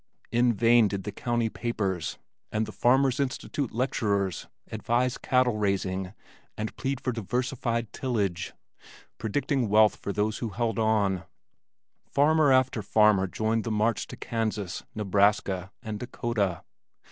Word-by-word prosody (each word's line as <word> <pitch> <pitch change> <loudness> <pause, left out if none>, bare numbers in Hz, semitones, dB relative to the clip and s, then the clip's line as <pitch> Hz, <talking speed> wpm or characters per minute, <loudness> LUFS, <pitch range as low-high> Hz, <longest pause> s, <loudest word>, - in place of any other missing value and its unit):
In 120 +1 +3
vain 115 +1 +5
did 100 -1 -4
the 105 - -4
county 120 +1 -1
papers 100 -7 -2 0.3
and 110 +1 0
Farmer's 130 +1 +3
Institute 140 0 -2
lecturers 100 - -1 0.2
advise 120 +4 0
cattle 125 -3 +2
raising 95 -1 -1 0.4
and 110 0 -4
plead 135 -1 -2
for 130 - -1
diversified 115 0 -2
tillage, 100 -9 -2 0.7
predicting 130 - 0
wealth 110 +1 +5
for 100 - -5
those 105 +2 -1
who 115 - -3
held 115 +1 -1
on; 100 -5 +1 0.8
farmer 150 0 +3
after 130 -3 +3
farmer 105 -2 +4
joined 110 +4 -1
the 115 - -3
march 110 +1 0
to - - -9
Kansas, 110 -5 -3
Nebraska, 100 -2 +1
and 110 -3 -5
Dakota. 115 -7 -2
110 Hz, 125 wpm, -27 LUFS, 100-120 Hz, 0.8 s, vain